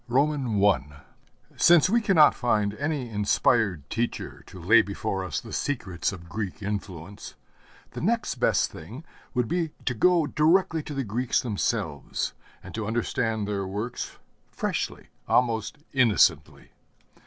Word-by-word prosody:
I 115 - +1 0.6
Since 175 -1 +6
we 230 +5 +2
cannot 185 -8 +6
find 105 -4 0
any 145 -3 -2
inspired 105 - +1
teacher 120 +1 -3
to 95 - -11
lay 110 +7 +6
before 100 -2 -3
us 90 -6 -3
the - - -10
secrets 95 - -2
of 85 -3 -10
Greek 100 +3 -5
influence, 100 -2 -6 0.6
the - - -7
next 225 +5 0
best - - +2
thing 115 - -10 0.3
would 125 -2 +1
be 170 0 -1
to 125 - +1
go 170 +6 +3
directly 165 +3 +2
to 145 -1 -7
the 135 - -1
Greeks 120 +3 0
themselves, 90 - -2 0.3
and - - -10
to 110 +2 -1
study 110 -3 -1
their 100 -2 -2
works 105 +6 -5 0.3
freshly, - - -3 0.2
almost 115 -4 +1 0.2
innocently. 105 - +2
115 Hz, 130 wpm, -26 LUFS, 100-145 Hz, 0.6 s, Since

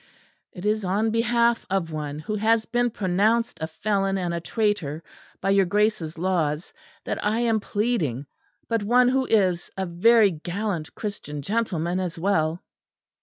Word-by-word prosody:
"It 180 +1 -9
is 215 0 +1
on 205 +4 +1
behalf 235 +1 +2
of 185 -4 -1
one 150 -2 -4
who 155 +8 -5
has 220 +1 +2
been 245 0 +1
pronounced 215 +4 +1
a 160 - -1
felon 195 +3 -1
and 175 -2 -2
a 170 - -1
traitor 170 -6 -1 0.4
by 195 - +1
your 195 -2 +4
Grace's 205 -5 0
laws, 165 -3 -1 0.3
that - - -3
I 215 +3 +1
am 225 -2 +2
pleading; 200 - -1 0.4
but 230 -2 0
one 245 +4 +4
who 265 0 +1
is 185 -5 +2
a 190 - -1
very 205 +4 +4
gallant 175 +1 -4
Christian 150 -9 -5
gentleman 185 -4 -1
as 180 -3 -3
well." 165 -2 0
195 Hz, 155 wpm, -25 LUFS, 170-220 Hz, 0.4 s, your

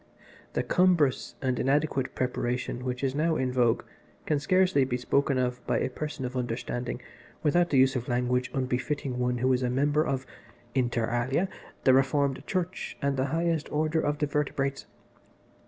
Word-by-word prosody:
"The - - 0
cumbrous 175 -7 +2
and 130 -2 0
inadequate 140 -1 +1
preparation 125 0 -2
which 125 +1 -3
is 135 -1 +1
now 160 +3 +1
in 130 -3 0
vogue 120 -3 +2 0.4
can 150 -2 +1
scarcely 185 -1 +3
be 125 -1 -1
spoken 140 +2 +1
of 125 -1 -1
by - - +2
a - - -1
person 150 -1 -4
of 125 +1 -5
understanding 120 0 -3 0.4
without 175 +3 +3
the 140 - +2
use 130 +1 +5
of 125 +1 -2
language 125 0 0
unbefitting 130 0 -2
one 125 0 +1
who 130 +2 +2
is 125 - +1
a 125 - 0
member 145 +4 +2
of 135 -3 -2 0.5
(inter 120 -3 +1
alia) 130 +10 0 0.4
the 130 - +6
Reformed 135 +1 +2
Church 185 -1 -3
and 140 0 0
the 130 0 +1
highest 165 +2 -1
order 155 +1 +1
of 145 0 0
the 150 - +1
vertebrates. 140 -1 -1
135 Hz, 170 wpm, -28 LUFS, 125-150 Hz, 0.5 s, the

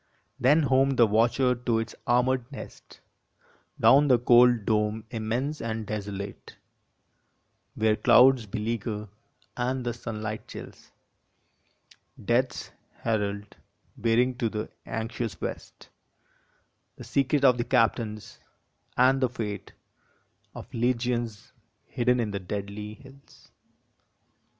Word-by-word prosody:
Then 145 +6 +4
honied 135 -1 +2
the 120 - +7
watcher 120 +4 +2
to 120 -1 -1
its 115 +1 -3
armored 125 +1 +1
nest, 135 - -11 0.8
Down 145 +2 +6
the 125 -3 +5
cold 120 -2 +5
dome 105 0 0
immense 120 +6 -2
and 110 -1 -3
desolate, 100 -1 -6 1.2
Where 110 0 +2
clouds 125 0 +5
beleaguer 105 -1 -3 0.5
and 125 +1 -2
the 120 - -1
sunlight 110 -2 -6
chills - - -11 1.3
Death 120 +4 +1
s - - -8 0.3
herald, 105 -2 -2 0.4
bearing 120 +1 +1
to 115 - +1
the 105 0 -5 0.2
anxious 115 0 -4
west - - -7 1.1
The - - -11
secret 140 +1 +1
of 125 -2 +5
the - - +1
captains, 115 -3 0 0.6
and 130 +2 +4
the 130 - +2
fate 105 -4 -5 0.8
Of - - -10
legions 120 -2 -1 0.3
hidden 125 +1 +1
in 110 -3 -1
the 100 - -3
deadly 100 +2 -6
hills. 135 +3 -18
115 Hz, 110 wpm, -27 LUFS, 110-125 Hz, 1.3 s, the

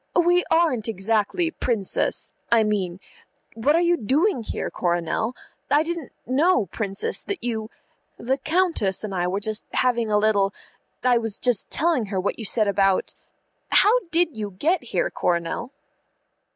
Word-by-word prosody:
"We 350 +1 +4
aren't 315 -10 +2
exactly, 225 - 0
Princess 225 - -1 0.2
I 230 -1 +5
mean 190 -4 -1 0.5
What 260 +7 +2
are 335 - +3
you 345 0 +3
doing 290 - +1
here, 220 - -4
Coronel? 175 +7 -1 0.3
I 295 +2 +4
didn't 335 -4 -5
know, 290 - +2
Princess, 195 +2 -2
that 395 -9 -5
you 220 -2 -2 0.5
The 265 +4 -1
Countess 315 - +1
and 210 -2 -4
I 175 -1 0
were 190 +2 -1
just 215 +1 -2
having 240 -3 +1
a 210 - +3
little 205 -2 +2 0.5
I 245 -2 +4
was 225 -2 -3
just 245 -5 +1
telling 305 -8 +1
her 195 -1 -2
what 190 - -2
you 225 - -5
said 215 +1 +1
about 195 -1 +2 0.6
How 455 +4 +5
did 335 -4 +1
you 210 -2 -4
get 320 - +1
here, 190 -6 -1
Coronel?" 175 +8 -1
225 Hz, 150 wpm, -23 LUFS, 200-310 Hz, 0.6 s, I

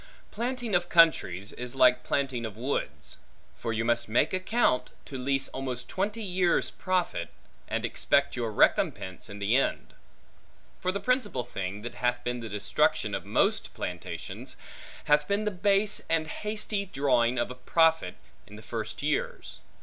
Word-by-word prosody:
Planting 240 -1 -3
of 175 0 +2
countries, 105 - +4
is 125 +1 -2
like 125 -1 +5
planting 130 -4 -1
of 110 -3 -6
woods; 130 +5 -3 0.4
for 115 - -4
you 115 0 -1
must 120 -1 +2
make 120 +9 +2
account 185 - +1
to 140 - -8
leese 135 +1 +1
almost 130 -2 -4
twenty 210 +4 -2
years' 180 -2 +1
profit, 185 -2 -1 0.4
and - - -1
expect - - +1
your 120 -3 -2
recompense 95 -1 +1
in 100 - -8
the 100 +4 +1
end. 135 - 0 0.9
For 185 - 0
the 200 - -3
principal 250 - 0
thing, 100 -3 -5
that 120 - -5
hath 125 0 -1
been 120 0 -2
the 115 -1 -6
destruction 105 -1 +1
of - - -3
most - - +1
plantations, - - -6 0.5
hath 150 0 +3
been 205 +1 0
the 210 - +1
base 200 +2 +2
and 165 -1 +2
hasty 210 +3 -3
drawing 125 -6 +2
of 125 - -1
profit, 165 -1 +3 0.3
in - - -12
the - - -11
first - - -5
years. 485 0 -2
135 Hz, 155 wpm, -28 LUFS, 120-185 Hz, 0.9 s, like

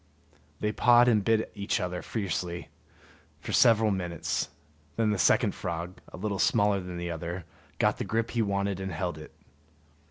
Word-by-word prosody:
They 105 - +1
pawed 120 +2 +5
and 110 -4 +4
bit 110 +1 +1
each 100 -1 -1
other 90 -1 -3
fiercely 90 -5 -3 0.7
for - - -6
several 110 -3 +5
minutes; 90 -3 -2 0.5
then 110 -2 +2
the 105 - -1
second - - +4
frog, 85 +2 -5
a - - -9
little 100 0 -2
smaller 105 -3 +3
than 90 -1 -6
the 85 0 -3
other, 85 +1 -5 0.3
got - - +2
the - - -1
grip 115 +1 -1
he 120 - 0
wanted 100 -2 -1
and 95 0 -4
held 85 -1 -3
it. 75 - -11
100 Hz, 165 wpm, -28 LUFS, 90-110 Hz, 0.7 s, pawed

